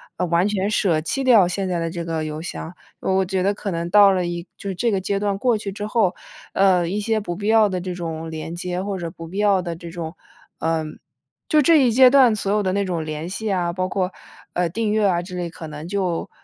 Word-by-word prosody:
呃， 180 - -1
完 170 +3 +2
全 205 -1 0
舍 185 -7 +2
弃 270 - -2
掉 230 -7 +7
现 190 +2 -2
在 180 -2 -1
的 165 0 -2
这 170 0 -5
个 165 -1 -2
邮 155 0 -5
箱。 170 0 -6 0.3
我 190 0 +1
觉 185 0 -1
得 200 +2 +2
可 200 -1 -5
能 170 0 -3
到 200 +1 +7
了 180 -1 0
一 175 +1 -4
就 200 - -6
是 190 - -3
这 235 +7 +1
个 195 -3 0
阶 195 +1 -1
段 200 -1 -1
过 240 +1 +2
去 205 -1 -5
之 205 +1 -5
后， 215 -4 +1 0.4
呃， 185 -3 +3
一 190 +4 -2
些 220 +1 0
不 175 -4 -4
必 205 +3 -4
要 220 -1 +5
的 185 -2 -3
这 180 0 -4
种 165 -2 -5
连 160 +1 -5
接， 180 +1 -3
或 195 0 -3
者 170 -2 -5
不 165 0 -10
必 185 +4 -8
要 200 -2 +3
的 170 -2 -4
这 170 +1 -9
种 165 -1 -6 0.4
呃， 160 -1 0 0.6
就 305 - +4
这 310 -1 +5
一 240 - +3
阶 255 +2 +7
段 260 -4 +6
所 200 -1 -2
有 210 +1 +2
的 185 - 0
那 200 0 0
种 175 -4 -2
联 155 +1 -5
系 205 +4 -3
啊， 175 -2 0
包 185 +1 -1
括， 185 -1 -1 0.4
呃， 175 -1 0
订 220 +4 -1
阅 215 0 +2
啊 175 -2 +1
之 180 0 -8
类， 175 -1 -3
可 165 - -9
能 150 +1 -8
就， 185 -3 -2
185 Hz, 275 characters per minute, -22 LUFS, 170-205 Hz, 0.6 s, 掉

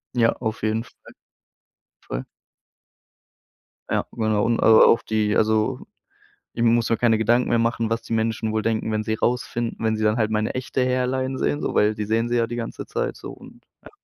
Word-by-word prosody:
Ja, 115 -2 +3
auf 110 -3 -5
jeden 110 +1 0
Fall. - - -19 1.1
Voll. - - -6 1.6
Ja, - - 0
genau. 110 -2 0
Und, 115 0 +1
äh, - - +1
auf 110 +1 +6
die 110 -1 0
also, 110 0 +1 0.8
ich 115 - -2
muss 115 0 +3
mir 115 - +2
keine 115 -1 +2
Gedanken 120 +3 +2
mehr 120 - +3
machen, 115 -1 0
was 115 0 0
die - - -4
Menschen 110 0 -1
wohl 110 0 0
denken, 110 0 -1
wenn 110 0 -1
sie 110 - -1
rausfinden 120 0 -2
wenn 110 0 +1
sie 110 - -2
dann 105 +1 +2
halt 110 -2 0
meine 110 0 -1
echte 130 0 -2
Hairline 130 +1 -1
sehen 145 - -1
so, - - -3
weil 105 +1 +3
die 105 -1 -4
sehen 115 +2 0
sie 120 - +1
ja 115 -1 +2
die 120 - -6
ganze 115 -1 -6
Zeit - - -3
so - - -9
und - - -15 0.2
ja. - - -13
115 Hz, 200 wpm, -23 LUFS, 110-120 Hz, 1.6 s, auf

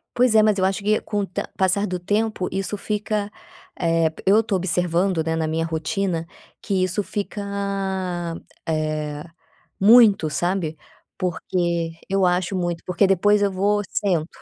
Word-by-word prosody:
Pois 245 -2 +3
é, 215 - +7
mas 215 -2 +3
eu 185 - +2
acho 195 +2 0
que 215 +1 +2
com 210 -1 -2
o 200 - -1
te 180 - -4
passar 190 +2 +2
do 180 -2 -3
tempo 205 +1 -1
isso 195 +2 -3
fica, 210 0 -2 0.5
eh, 165 -2 +2
eu 205 +3 +6
estou 215 -3 -1
observando, 180 0 0
né, 160 0 -1
na 160 -1 0
minha 160 +1 -1
rotina 165 +2 -2 0.3
que 190 -2 0
isso 185 +3 0
fica, 205 +1 -4 1.3
eh, 155 -1 -2 0.6
muito, 210 -5 +6
sabe. 175 -1 -1 0.4
Porque 170 -1 -1 0.2
eu 195 0 +2
acho 180 +2 0
muito, 175 -2 -2
porque 180 +2 +3
depois 205 +2 +3
eu 200 - +2
vou, 205 +2 +1
sento. 175 -6 0
185 Hz, 155 wpm, -22 LUFS, 165-205 Hz, 1.3 s, é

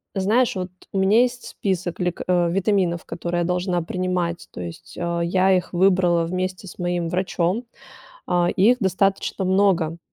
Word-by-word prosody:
знаешь, 215 +5 +2
от, 180 0 -3 0.2
у 195 - 0
меня 205 +5 +5
есть 245 0 -1
список 185 -3 -3
лек 180 -1 -2
э, 175 -2 +2
витаминов, 185 -2 +1
которые 175 +1 -3
я - - 0
должна 180 0 0
принимать, 180 0 -2
то - - -8
есть, 85 -1 -9
а, 170 0 -1
я 185 +2 +2
их 180 +1 -2
выбрала 180 -2 +3
вместе 185 +2 -3
с 175 - -11
моим 175 -1 -1
врачом. 185 +4 -1 0.6
А, 175 -1 +2
их 235 +7 +5
достаточно 195 0 0
много. 185 -4 +2
180 Hz, 160 wpm, -22 LUFS, 175-195 Hz, 0.6 s, меня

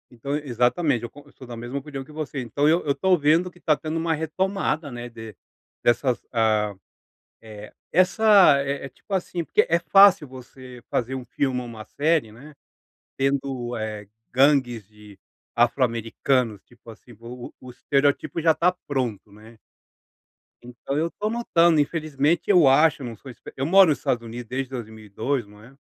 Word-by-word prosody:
Então 130 +4 -5
e 150 -1 -5
exatamente, 125 +2 +1
eu 120 - -5
con 145 - -15
eu 145 - -20
sou 130 - -13
da 120 - -8
mesma 120 +4 -6
opinião 140 -1 -6
que 135 - -16
você, 150 -2 -5
então 125 +5 0
eu 165 +3 +3
eu 145 - +1
estou 185 +4 +2
vendo 160 +4 +2
que 175 - -21
está 155 -3 +2
tendo 155 +3 -5
uma 165 0 0
retomada, 160 0 -2
né, 120 0 -7
de 115 -3 -11 0.5
dessas 120 +1 +1
ah, 110 -2 +1 0.7
eh, 105 -1 -11 0.2
essa, 185 -3 +5
eh 140 0 -4
eh, - - -7
tipo 170 - -17
assim 175 -2 -2
porque - - +2
é 170 - +3
fácil 185 +1 +5
você 130 -1 -12
fazer 125 +2 -2
um 130 -1 -6
filme 130 0 -2
ou 125 - -7
uma 110 -2 -9
série, 150 -6 0
né, 140 +7 -14 0.6
tendo, 135 -3 -2
eh, 105 -2 -6 0.2
gangues 130 -5 +2
de 105 -2 -17 0.4
afro 120 +3 +2
americanos, 115 -1 -1
tipo 120 -1 -19
assim, 115 +2 -14
o 120 +1 -9
o - - -18
o - - -8
estereótipo 140 +5 0
já 165 0 +4
está 170 +3 +2 0.2
pronto, 120 -7 -3
né. 110 +2 -16 1.1
Então 125 +3 -6
eu 160 +2 +1
estou 210 +5 -4
notando, 170 -8 +2
infelizmente, 155 +1 0
eu 180 -8 +5
acho, 150 +3 +4
eu - - -5
não 115 - -7
sou 130 +5 -11
espe 115 - -13
eu 135 - -1
moro 190 +4 +6
no 155 - +3
Estados 125 -3 -2
Unidos 115 +1 -8
desde 130 +2 -4
2002, 110 +1 -4
não 105 +1 -17
é. 125 +4 -17
135 Hz, 185 wpm, -23 LUFS, 120-155 Hz, 1.1 s, moro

